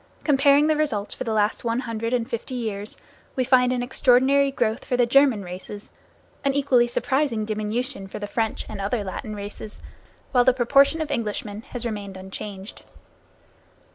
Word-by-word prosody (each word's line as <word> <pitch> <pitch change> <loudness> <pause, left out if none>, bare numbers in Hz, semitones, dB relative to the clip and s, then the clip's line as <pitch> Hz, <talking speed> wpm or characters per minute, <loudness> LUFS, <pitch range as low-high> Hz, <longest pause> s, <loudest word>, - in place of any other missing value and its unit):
Comparing 285 0 +5
the 310 0 +3
results 265 -10 -1
for - - -5
the 225 - -2
last 210 0 +1
one 235 +1 0
hundred 230 -2 -3
and 240 -2 0
fifty 255 +1 -4
years, 215 -3 -4 0.4
we 255 - +1
find 250 -1 +4
an 250 -1 0
extraordinary 265 +2 +4
growth 245 -4 -1
for 250 - -1
the 245 - +4
German 255 -4 +4
races, 185 +3 -8 0.5
an 275 -1 +1
equally 265 -4 +3
surprising 260 -2 0
diminution 215 0 -2
for - - -7
the 210 - -4
French 220 +1 -2
and 210 -2 -6
other 210 +2 -1
Latin 205 +2 -5
races, 205 +1 -8 0.5
while 245 -2 +5
the 255 - +5
proportion 275 +5 +4
of 305 -2 -3
Englishmen 210 -4 -3
has 245 -1 -5
remained 205 -4 -4
unchanged. 190 +1 -8
235 Hz, 170 wpm, -24 LUFS, 210-265 Hz, 0.5 s, Comparing